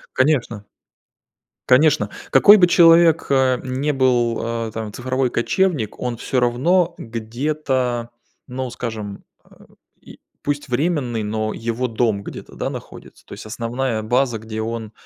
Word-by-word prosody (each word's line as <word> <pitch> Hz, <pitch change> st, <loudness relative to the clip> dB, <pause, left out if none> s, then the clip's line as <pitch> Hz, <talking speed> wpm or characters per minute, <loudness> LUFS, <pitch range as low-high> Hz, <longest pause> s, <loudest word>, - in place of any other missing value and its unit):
Конечно. 130 Hz, -7 st, +1 dB, 1.0 s
Конечно, 150 Hz, +4 st, +4 dB, 0.2 s
какой 205 Hz, +1 st, +8 dB
бы 185 Hz, -4 st, +5 dB
человек, 165 Hz, -2 st, +5 dB
э, 130 Hz, -2 st, +3 dB
не 135 Hz, +3 st, -2 dB
был, 125 Hz, -4 st, +1 dB, 0.3 s
э, -, -, -8 dB
там 110 Hz, -1 st, -5 dB
цифровой 130 Hz, +2 st, -1 dB
кочевник, 145 Hz, -, 0 dB
он 125 Hz, -1 st, -3 dB
всё 125 Hz, +3 st, -1 dB
равно 165 Hz, +9 st, +2 dB
где-то, 120 Hz, +1 st, -2 dB, 0.4 s
ну 130 Hz, 0 st, -4 dB
скажем, 110 Hz, -4 st, -6 dB, 0.2 s
а, -, -, -20 dB, 0.3 s
и, -, -, -15 dB, 0.2 s
пусть 145 Hz, 0 st, -3 dB
временный, 130 Hz, -4 st, -1 dB
но 110 Hz, +1 st, -2 dB
его 115 Hz, +2 st, -3 dB
дом 110 Hz, -3 st, 0 dB
где-то, -, -, -10 dB
да, -, -, -3 dB
находится, -, -, -11 dB
то -, -, -9 dB
есть -, -, -10 dB
основная 115 Hz, +1 st, -3 dB
база, 120 Hz, +1 st, 0 dB
где 110 Hz, 0 st, -6 dB
он, 115 Hz, -1 st, -5 dB
125 Hz, 135 wpm, -20 LUFS, 115-140 Hz, 1.0 s, какой